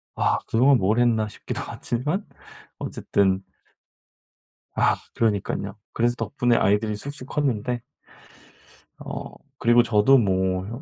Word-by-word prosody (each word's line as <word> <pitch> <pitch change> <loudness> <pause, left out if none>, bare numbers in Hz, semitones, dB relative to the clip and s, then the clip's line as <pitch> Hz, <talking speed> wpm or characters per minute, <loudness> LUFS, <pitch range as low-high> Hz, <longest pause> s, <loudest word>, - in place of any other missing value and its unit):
'아 - - +2
그동안 130 +4 +4
뭘 110 +3 +1
했나?' 115 -3 +2
싶기도 - - -6
하지만 150 - -3 0.5
어쨌든 95 -1 0 1.3
아 - - +3 0.2
그러니깐요. 100 -2 -1 0.2
그래서 120 +1 +1
덕분에 125 -2 0
아이들이 105 +1 +2
쑥쑥 140 +4 -8
컸는데. 125 -4 -1 1.2
어 - - -6 0.3
그리고 120 +1 +5
저도 115 +4 +5
뭐 95 -4 +1
혀 120 +5 -7
115 Hz, 250 characters per minute, -24 LUFS, 105-125 Hz, 1.3 s, 그리고